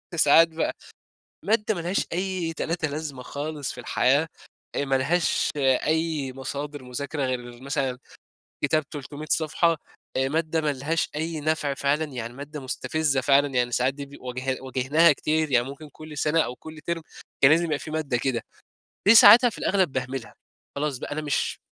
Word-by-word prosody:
ساعات 165 +1 +6
بقى 160 0 -2 0.7
مادة 215 +1 +1
ما 170 - -4
لهاش 175 +4 -1
أي 185 -2 -2
تلاتة 165 0 -2
لازمة 145 -3 -5
خالص 145 +1 -5
في - - -9
الحياة، 145 +5 +2 0.5
آآ، 140 - 0
ما 135 -1 0
لهاش 160 +6 +1
أي 145 +1 +1
مصادر 140 +2 -6
مذاكرة 140 +4 -4
غير 120 -1 -4
مثلًا 135 -3 -2 0.7
كتاب 155 +1 +2
300 145 0 -7
صفحة، 165 +1 +2 0.4
آآ، 135 0 +1
مادة 160 +1 0
ما 150 -2 0
لهاش 150 +5 -1
أي 160 +1 -3
نفع 150 -2 0
فعلًا، 140 +3 0
يعني 120 -4 -6
مادة 145 +3 -8
مستفزة 140 +1 -1
فعلًا، 140 +1 +4
يعني 125 -2 0
ساعات 125 +2 +1
دي 140 0 -7
بي 140 +1 -13
واجه 130 +1 -3
واجهناها 135 +5 +3
كتير، 155 +1 0
يعني 120 -1 +3
ممكن 140 +3 -9
كل 155 0 -11
سنة 155 +2 +2
أو 125 - -3
كل 155 -1 -11
تِرم 170 -1 -1 0.4
كان 135 - +7
لازم 165 +2 +4
يبقى 150 -3 -1
في 155 - -8
مادة 150 -6 -1
كده. 120 -2 -1 0.7
دي 225 - +9
ساعتها 240 +2 +9
في - - -11
الأغلب 185 -7 +1
باهملها، 130 -1 -4 0.4
خلاص 140 -2 -1
بقى، - - -6
أنا 155 - -2
مش 145 -2 -1
145 Hz, 170 wpm, -25 LUFS, 135-160 Hz, 0.7 s, دي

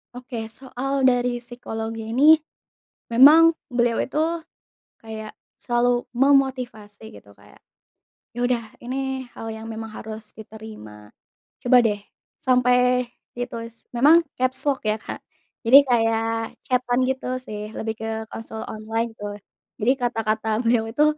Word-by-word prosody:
Oke, 245 -3 -6
soal 265 +2 -2
dari 245 -1 +2
psikologinya 225 -2 -6
ini, 280 - +5 0.8
memang 310 +7 +7 0.2
beliau 240 -1 +2
itu 290 - -3 0.8
kayak 220 -1 -8 0.2
selalu 240 0 +1
memotivasi 250 -6 +1
gitu, 100 - -17
kayak, - - -20 0.7
"Ya 245 +1 -1
udah, 245 -2 0 0.2
ini 265 +1 -4
hal 225 - -6
yang 220 0 -7
memang 225 0 -6
harus 215 0 -9
diterima, 210 - -11 0.5
coba 250 +1 +5
deh" 210 -2 0 0.5
sampai 250 -1 +3 0.2
ditulis, 230 -1 -7
memang 295 +8 +5 0.2
capslock 265 +2 0
ya, 215 - +3
Kak, - - -6 0.5
jadi 260 +4 +10
kayak 225 -1 +2 0.4
chat-an 250 -1 +1
gitu 260 -1 -2
sih, 210 -2 -7
lebih 220 0 -3
ke 220 - -5 0.2
konsul 225 0 -7
online 225 +2 -3
gitu. 215 -2 -8 0.6
Jadi 230 - +4
kata-kata 225 -2 -1
beliau 230 -1 +2
itu 295 +7 +2
240 Hz, 120 wpm, -23 LUFS, 220-255 Hz, 0.8 s, jadi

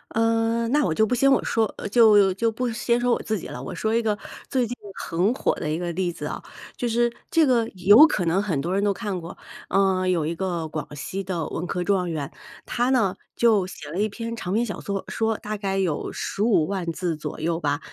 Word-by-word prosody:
嗯， 230 +1 +1
那 295 +2 +3
我 160 - +1
就 220 - +3
不 220 - -1
先 275 +3 +4
我 - - +3
说， 225 -1 +1 0.2
就 210 -4 +6
就 225 +4 0
不 250 +3 -2
先 235 +1 +1
说 245 0 +1
我 - - -1
自 220 -1 -2
己 - - -7
了， - - -7
我 - - -6
说 220 0 -1
一 230 - +3
个 215 -2 0 0.3
最 255 -3 +1
近 240 +2 -5 0.2
很 175 +6 0
火 - - +1
的 155 - -4
一 155 - 0
个 175 0 -3
例 180 +1 -1
子 - - -7
啊， - - -4 0.3
就 240 - -2
是 240 +1 +1 0.2
这 330 -2 +4
个 240 -4 +2
有 205 - +8
可 185 - -1
能 170 +4 +2
很 180 -9 -1
多 170 +6 -2
人 200 +1 +1
都 205 - +3
看 200 -3 -3
过。 170 +2 -9 0.3
嗯， 190 -1 +2
有 170 -4 +1
一 160 - -1
个 170 -2 -2
广 150 -1 -4
西 190 +7 -4
的 175 -4 -3
文 175 +2 -4
科 180 0 -2
状 185 -2 +1
元， 150 -4 -4 0.3
她 245 +1 0
呢 220 -8 +2 0.2
就 215 -6 +3
写 150 -5 -9
了 175 - -3
一 215 +1 +1
篇 230 +2 -5
长 185 -5 -5
篇 225 +4 +2
小 205 - -5
说 200 -1 -3
说， 225 -1 0
大 215 0 -5
概 195 -1 -2
有 175 -6 -1
15 205 -6 +1
万 185 -2 -2
字 170 0 -2
左 150 -1 -6
右 165 +1 -1
吧。 145 -2 0
200 Hz, 250 characters per minute, -24 LUFS, 175-230 Hz, 0.3 s, 有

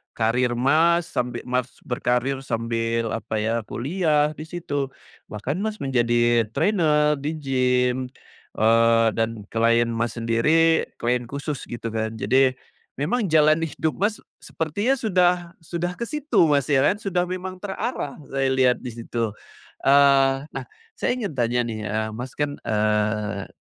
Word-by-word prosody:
karir, 120 +2 +1
Mas, 160 +7 +3
sambil, 120 -1 -2
Mas, 125 0 -1
berkarir, 125 +2 -1
sambil 115 -1 -1
apa 110 -1 -3
ya, 115 +1 -1
kuliah, 150 - +1
di 155 - -6
situ. 145 -5 -3 0.4
Bahkan, 125 - -3
Mas, 215 +1 -3
menjadi 120 -3 +2
trainer 150 -3 +2
di 145 +3 -2
gym. 125 -3 +1 0.6
Eee, 115 +1 +4
dan 115 -2 -2
klien, 115 +1 +3
Mas, 115 0 -2
sendiri, 155 +9 +3
klien 125 +1 0
khusus 140 +2 -5
gitu 120 -1 -6
kan. 110 0 -2
Jadi, 130 0 +3 0.5
memang 220 +11 0
jalan 155 +1 +4
hidup, 155 -3 -2
Mas, 210 +2 0
s - - -18 0.3
sepertinya 205 - 0
sudah 180 -5 +3 0.3
sudah 175 +2 -3
ke 235 - -5
situ, 300 - +1
Mas, 145 -3 +2
ya 140 -2 +3
kan? 205 +5 +2
Sudah 180 -4 0
memang 185 +1 -5
terarah 200 - -4
saya 135 -1 0
lihat 130 -1 +3
di 125 - -5
situ. 115 -1 -3 0.5
Eee, 135 0 +4
nah, - - -6 0.3
saya 250 - -1
ingin 210 -8 -3
tanya 120 -1 0
nih, 110 -2 -4
eee, 110 +1 -1
Mas, 125 +3 -7
kan, 145 -1 -2
eee, 105 -1 0
135 Hz, 145 wpm, -23 LUFS, 115-160 Hz, 0.6 s, Eee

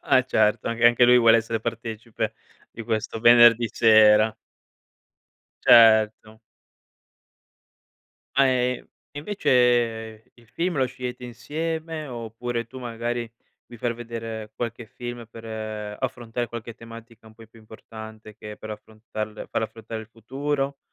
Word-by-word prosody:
e 130 -1 +5
certo, 110 -3 +1
anche 115 0 +3
anche 120 +1 +5
lui 125 0 +6
vuole 115 -1 +6
essere 115 0 -2
partecipe 115 -1 -4 0.4
di 115 - -8
questo 110 0 -3
venerdì 120 -1 +7
sera. 110 -1 +5 1.3
Certo. 110 -1 +5 2.0
Ma, 135 - +6
ehm, 125 -1 0 0.2
e 145 - -9
invece, 120 - 0
il 120 -1 -22
film 170 +7 -2
lo 130 - +2
scegliete 125 -1 -7
insieme, 160 +5 -5
oppure 115 -1 -5
tu, 130 +2 -11
magari, 120 -1 -4 0.4
vi 120 - -12
far 120 +1 -2
vedere 115 -2 -7
qualche 120 0 -5
film 120 +1 -8
per 115 - -12 0.5
affrontare 120 -2 -3
qualche 115 0 -8
tematica 115 -1 -13
un 110 - -16
poi 115 0 -16
più 115 - -19
importante 110 0 -12
che 105 -1 -10
per 110 - -9
affrontarle 110 0 -7
farle 110 - -1
affrontare 115 0 -8
il - - -14
futuro, 135 +5 -3
115 Hz, 130 wpm, -24 LUFS, 110-125 Hz, 2.0 s, venerdì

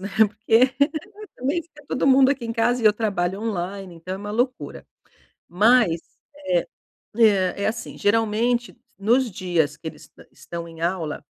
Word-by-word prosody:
né 195 - -5
porque, 225 +4 +3 0.6
também 285 +7 -1
fica 300 -2 -19
todo 260 - 0
mundo 265 0 +6
aqui 275 -4 -1
em 230 - -3
casa 240 +1 +1
e - - -1
eu 210 - +7
trabalho 200 -3 -1
online, 195 -3 -4
então 175 +3 -7
é - - -7
uma 205 +1 -6
loucura. 250 +3 -2 0.6
Mas, 205 -3 +3 1.2
eh 200 -6 +4
eh, 200 - -3
é - - +2
assim 225 +1 -4
geralmente 225 +3 +1 0.2
nos 235 +5 +2
dias 175 -7 -1
que - - -13
eles - - -13
est - - -16
estão 170 -1 -8
em 165 -1 -12
aula, 170 -4 -2
215 Hz, 165 wpm, -23 LUFS, 185-240 Hz, 1.2 s, eu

